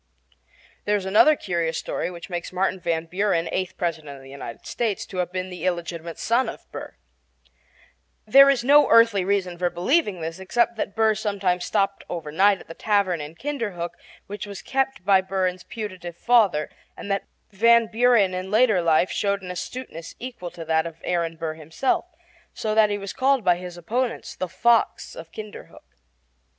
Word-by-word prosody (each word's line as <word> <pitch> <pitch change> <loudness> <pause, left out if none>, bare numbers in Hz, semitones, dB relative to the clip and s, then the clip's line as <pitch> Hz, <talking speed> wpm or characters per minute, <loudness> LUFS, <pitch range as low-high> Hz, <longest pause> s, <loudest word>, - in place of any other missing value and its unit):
There 210 - +2
is 200 -2 -2
another 215 +11 +5
curious 170 - -2
story - - -3
which 175 -1 -9
makes 175 -2 -5
Martin 190 +1 0
Van 165 -2 -1
Buren, 180 -1 0
eighth 185 0 -3
President 160 -5 -3
of 135 - -13
the 135 - -13
United 135 -4 -9
States, 225 -5 -2
to 190 - -9
have 180 -1 -1
been 185 0 -4
the 180 -2 -8
illegitimate 170 -2 -3
son 240 +3 +1
of - - -5
Aaron - - -26
Burr. - - -8 1.3
There 275 +6 +8
is 265 -4 +2
no 290 +3 +6
earthly 230 -4 +5
reason 185 -2 -1
for 180 -1 +1
believing 205 - +1
this, 165 +2 -5
except 235 +5 +1
that 200 -2 -3
Burr 220 -1 +3
sometimes 195 -4 -1
stopped 195 0 0
overnight 175 +5 +2
at - - -14
the 165 - -8
tavern 200 -4 +1
in 150 +2 -8
Kinderhook 210 -11 -4 0.3
which 205 +1 -7
was 200 -1 -8
kept 270 -7 -1
by 195 -1 +5
Van 190 - -22
Buren's 185 -1 -1
putative 185 -6 -7
father, 205 -11 +3 0.3
and 200 - -6
that 195 - -1 0.2
Van 230 +3 +5
Buren 225 -4 +3
in 185 +1 -4
later 215 -3 +4
life 165 +2 +3
showed 200 -1 -1
an 180 - -5
astuteness 180 -2 -7
equal 240 -8 -7
to 165 -1 -9
that 160 +1 +1
of 165 -1 -10
Aaron 170 -2 -1
Burr 160 -1 -3
himself, 160 - -1 0.5
so 215 -1 -2
that 215 -1 +5
he 205 - -1
was 200 -1 -6
called 270 -2 +2
by 180 -2 +3
his 180 -1 -8
opponents 235 +8 -3
"the 185 - -4
fox 230 +5 +1
of 165 0 -10
Kinderhook." 215 +1 -10
190 Hz, 185 wpm, -24 LUFS, 175-220 Hz, 1.3 s, There